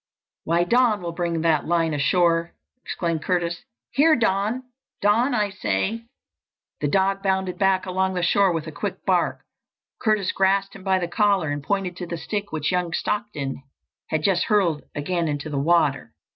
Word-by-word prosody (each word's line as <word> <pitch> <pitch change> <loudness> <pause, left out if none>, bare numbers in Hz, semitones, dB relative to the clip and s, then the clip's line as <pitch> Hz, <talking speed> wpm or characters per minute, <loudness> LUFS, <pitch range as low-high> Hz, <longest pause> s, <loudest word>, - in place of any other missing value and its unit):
"Why, 170 +2 +2
Don 225 0 +2
will 170 - -3
bring 170 -1 -2
that 160 -2 +1
line 165 -1 +1
ashore!" 170 +3 +2 0.3
exclaimed 165 -3 -2
Curtis. 175 -1 -1 0.3
"Here, 310 +3 +5
Don! 225 +2 0 0.4
Don, 235 +6 +2
I 210 -2 0
say!" 195 - -2 0.7
The 145 - 0
dog 195 +5 +1
bounded 190 -2 -1
back 190 -1 +2
along 190 0 -1
the 180 - -1
shore 195 +2 +3
with 165 -2 -2
a - - -6
quick - - -5
bark. - - +1 0.6
Curtis 215 -5 +1
grasped 195 +1 +1
him 195 - -11
by 190 -1 +2
the 175 -2 -2
collar 195 -4 +1
and 145 0 -3
pointed 190 +2 -2
to 180 - -5
the 170 - -4
stick 205 +4 -4
which 155 +1 -1
young 180 -2 -1
Stockton 205 -13 -3 0.5
had 155 -1 -1
just 185 -2 +2
hurled 185 -8 +2
again 170 +3 -1
into 150 +1 -3
the 140 - -1
water. 150 -2 +1
180 Hz, 170 wpm, -23 LUFS, 165-200 Hz, 0.7 s, Here